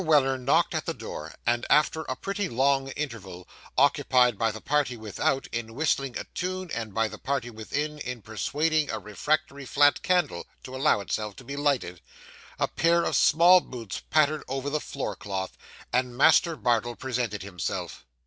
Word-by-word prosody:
Weller 145 Hz, -5 st, +4 dB
knocked 125 Hz, +2 st, +2 dB
at -, -, -3 dB
the -, -, -2 dB
door, 75 Hz, +1 st, -7 dB
and 120 Hz, 0 st, +1 dB
after 150 Hz, +1 st, +3 dB
a 130 Hz, -, -1 dB
pretty 200 Hz, -, -3 dB
long 135 Hz, +2 st, +2 dB
interval 100 Hz, -11 st, -6 dB, 0.3 s
occupied 130 Hz, -3 st, +4 dB
by 115 Hz, +2 st, +1 dB
the 110 Hz, -, -8 dB
party 145 Hz, -3 st, 0 dB
without, 135 Hz, +6 st, -1 dB
in 115 Hz, -1 st, -4 dB
whistling 135 Hz, -3 st, 0 dB
a -, -, -4 dB
tune, 185 Hz, -1 st, -3 dB
and 110 Hz, -2 st, -4 dB
by 115 Hz, +2 st, +1 dB
the 105 Hz, 0 st, -9 dB
party 130 Hz, -3 st, -2 dB
within, 145 Hz, +7 st, -4 dB
in 125 Hz, -5 st, -5 dB
persuading 150 Hz, +8 st, 0 dB
a -, -, -2 dB
refractory 140 Hz, +7 st, -2 dB
flat 145 Hz, +2 st, +3 dB
candle 180 Hz, -, 0 dB, 0.2 s
to 130 Hz, -, -8 dB
allow 135 Hz, -5 st, +3 dB
itself 105 Hz, +1 st, -3 dB
to -, -, -12 dB
be 140 Hz, +3 st, -6 dB
lighted 140 Hz, -, 0 dB, 0.6 s
a -, -, +1 dB
pair 170 Hz, +1 st, +2 dB
of -, -, 0 dB
small 175 Hz, +4 st, +6 dB
boots 115 Hz, -, -7 dB
pattered 155 Hz, 0 st, +3 dB
over 135 Hz, +2 st, -3 dB
the 150 Hz, 0 st, 0 dB
floor 130 Hz, -7 st, -4 dB
cloth, 95 Hz, -1 st, -4 dB, 0.4 s
and 125 Hz, -1 st, 0 dB
Master 165 Hz, +4 st, +5 dB
Bardell 120 Hz, -3 st, 0 dB
presented 120 Hz, -6 st, -3 dB
himself. 95 Hz, -3 st, -4 dB
130 Hz, 170 wpm, -27 LUFS, 115-150 Hz, 0.6 s, small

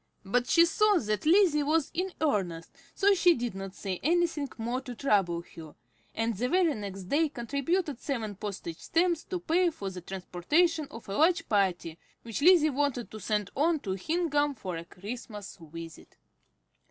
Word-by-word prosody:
But 245 Hz, +5 st, +1 dB
she 335 Hz, 0 st, +6 dB
saw 415 Hz, +4 st, +3 dB
that 215 Hz, 0 st, -1 dB
Lizzie 340 Hz, -4 st, +5 dB
was 305 Hz, +1 st, +1 dB
in 370 Hz, +2 st, -2 dB
earnest, 185 Hz, -, -1 dB, 0.2 s
so 405 Hz, 0 st, +4 dB
she 350 Hz, -2 st, +5 dB
did 240 Hz, -4 st, -3 dB
not 195 Hz, 0 st, -7 dB
say 190 Hz, -3 st, -4 dB
anything 330 Hz, -3 st, +1 dB
more 240 Hz, +3 st, -2 dB
to 250 Hz, -3 st, -8 dB
trouble 195 Hz, -9 st, +1 dB
her, 160 Hz, -3 st, -10 dB, 0.4 s
and 225 Hz, +1 st, 0 dB
the 250 Hz, +6 st, -1 dB
very 355 Hz, -2 st, +3 dB
next 195 Hz, -4 st, -6 dB
day 295 Hz, -, +1 dB
contributed 280 Hz, +4 st, -2 dB
seven 230 Hz, -8 st, -3 dB
postage 185 Hz, -4 st, -6 dB
stamps 340 Hz, 0 st, +1 dB
to 365 Hz, -, -3 dB
pay 345 Hz, +1 st, +2 dB
for 200 Hz, -, -6 dB
the 180 Hz, -1 st, -8 dB
transportation 280 Hz, -, 0 dB
of 230 Hz, -6 st, -11 dB
a 195 Hz, -, -4 dB
large 330 Hz, +1 st, +3 dB
party 180 Hz, -5 st, 0 dB, 0.2 s
which 230 Hz, +3 st, -5 dB
Lizzie 325 Hz, -2 st, +6 dB
wanted 275 Hz, -3 st, -1 dB
to 215 Hz, -, -8 dB
send 210 Hz, 0 st, -1 dB
on 315 Hz, +3 st, +2 dB
to 195 Hz, -, -4 dB
Hingham 295 Hz, -, 0 dB
for 185 Hz, -6 st, -5 dB
a 165 Hz, +1 st, -6 dB
Christmas 210 Hz, +2 st, -8 dB
visit. 165 Hz, 0 st, -10 dB
250 Hz, 170 wpm, -29 LUFS, 195-325 Hz, 0.4 s, she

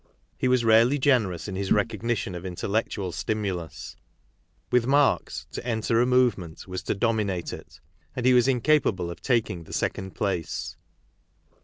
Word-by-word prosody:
He -, -, -1 dB
was 125 Hz, -2 st, +2 dB
rarely 115 Hz, +5 st, +5 dB
generous 115 Hz, -, +1 dB
in 95 Hz, -, -5 dB
his 95 Hz, 0 st, -3 dB
recognition 110 Hz, -1 st, 0 dB
of 90 Hz, 0 st, -6 dB
intellectual 95 Hz, +1 st, -2 dB
stimulus. 85 Hz, -8 st, -4 dB, 0.8 s
With 125 Hz, -1 st, +3 dB
Marx, 145 Hz, +1 st, +2 dB
to -, -, -6 dB
enter 115 Hz, -1 st, +1 dB
a 125 Hz, -, +2 dB
movement 120 Hz, -12 st, +1 dB
was 95 Hz, 0 st, -4 dB
to -, -, 0 dB
dominate 100 Hz, -5 st, -1 dB
it; -, -, -11 dB, 0.4 s
and 125 Hz, -, -3 dB
he 130 Hz, -, +6 dB
was 125 Hz, 0 st, +5 dB
incapable 125 Hz, -, +2 dB
of 85 Hz, -, -10 dB
taking 110 Hz, -9 st, 0 dB
the -, -, -11 dB
second 95 Hz, -1 st, -3 dB
place. 95 Hz, -6 st, -3 dB
110 Hz, 150 wpm, -26 LUFS, 95-125 Hz, 0.8 s, he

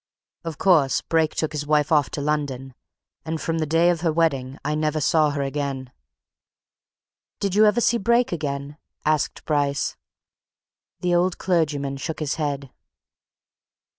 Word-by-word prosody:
Of 165 Hz, -3 st, -5 dB
course, 160 Hz, -8 st, +3 dB
Brake 160 Hz, -1 st, +1 dB
took 155 Hz, -, -1 dB
his 145 Hz, -1 st, -4 dB
wife 150 Hz, 0 st, +2 dB
off 150 Hz, -3 st, +3 dB
to 145 Hz, -, -4 dB
London 140 Hz, -3 st, -2 dB, 0.5 s
and 160 Hz, 0 st, -3 dB
from 165 Hz, +1 st, -2 dB
the 155 Hz, -, -1 dB
day 165 Hz, +3 st, +4 dB
of 170 Hz, -1 st, -2 dB
her 165 Hz, -2 st, +2 dB
wedding, 140 Hz, -5 st, 0 dB
I 150 Hz, -, 0 dB
never 155 Hz, 0 st, 0 dB
saw 155 Hz, 0 st, +3 dB
her 145 Hz, -1 st, -2 dB
again." 135 Hz, -2 st, -3 dB, 1.5 s
"Did 200 Hz, -2 st, -1 dB
you 215 Hz, +2 st, +6 dB
ever 210 Hz, +3 st, +3 dB
see 235 Hz, 0 st, +2 dB
Brake 235 Hz, +4 st, +2 dB
again?" 145 Hz, -3 st, -4 dB, 0.3 s
asked 155 Hz, -1 st, 0 dB
Bryce. 145 Hz, -2 st, 0 dB, 1.1 s
The 180 Hz, -1 st, +1 dB
old 175 Hz, +1 st, +2 dB
clergyman 145 Hz, -6 st, 0 dB
shook 155 Hz, +3 st, -5 dB
his 155 Hz, -3 st, -1 dB
head. 140 Hz, -3 st, -3 dB
150 Hz, 150 wpm, -23 LUFS, 140-165 Hz, 1.5 s, you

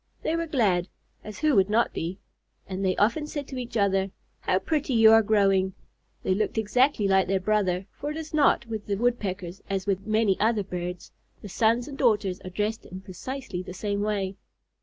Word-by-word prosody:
They 320 Hz, -, 0 dB
were 335 Hz, 0 st, -2 dB
glad 200 Hz, -, +1 dB, 0.4 s
(as 215 Hz, -, -8 dB
who 305 Hz, -1 st, +2 dB
would 195 Hz, 0 st, +4 dB
not 230 Hz, +3 st, +2 dB
be?) 170 Hz, +3 st, -4 dB, 0.5 s
and 190 Hz, 0 st, -4 dB
they 185 Hz, -1 st, +1 dB
often 235 Hz, +9 st, +1 dB
said 290 Hz, -2 st, -5 dB
to 265 Hz, -, -5 dB
each 235 Hz, -2 st, -4 dB
other: 195 Hz, -1 st, +2 dB, 0.3 s
"How 185 Hz, -, +1 dB
pretty 290 Hz, +4 st, -1 dB
you 225 Hz, -1 st, +7 dB
are 225 Hz, 0 st, +7 dB
growing!" 195 Hz, -3 st, +2 dB, 0.5 s
They 185 Hz, -, +2 dB
looked 215 Hz, +3 st, -1 dB
exactly 220 Hz, +1 st, +2 dB
like 190 Hz, -1 st, +3 dB
their 190 Hz, +1 st, +1 dB
brother, 190 Hz, -2 st, 0 dB
for 290 Hz, -, -6 dB
it 300 Hz, -, -4 dB
is 315 Hz, -1 st, -7 dB
not 295 Hz, -5 st, +3 dB
with 220 Hz, -2 st, -6 dB
the 200 Hz, -, 0 dB
Woodpeckers 195 Hz, -6 st, -2 dB
as 195 Hz, -1 st, -1 dB
with 195 Hz, 0 st, -1 dB
many 215 Hz, -3 st, +2 dB
other 220 Hz, -1 st, +2 dB
birds, 180 Hz, -1 st, -6 dB, 0.3 s
the 205 Hz, -, -7 dB
sons 230 Hz, +5 st, +2 dB
and 280 Hz, -2 st, -8 dB
daughters 205 Hz, -7 st, +2 dB
are 185 Hz, -, -7 dB
dressed 210 Hz, +4 st, -3 dB
in 185 Hz, +1 st, -8 dB
precisely 195 Hz, +1 st, -6 dB
the 180 Hz, 0 st, -9 dB
same 205 Hz, +1 st, -2 dB
way. 200 Hz, -2 st, -1 dB
205 Hz, 200 wpm, -26 LUFS, 190-235 Hz, 0.5 s, you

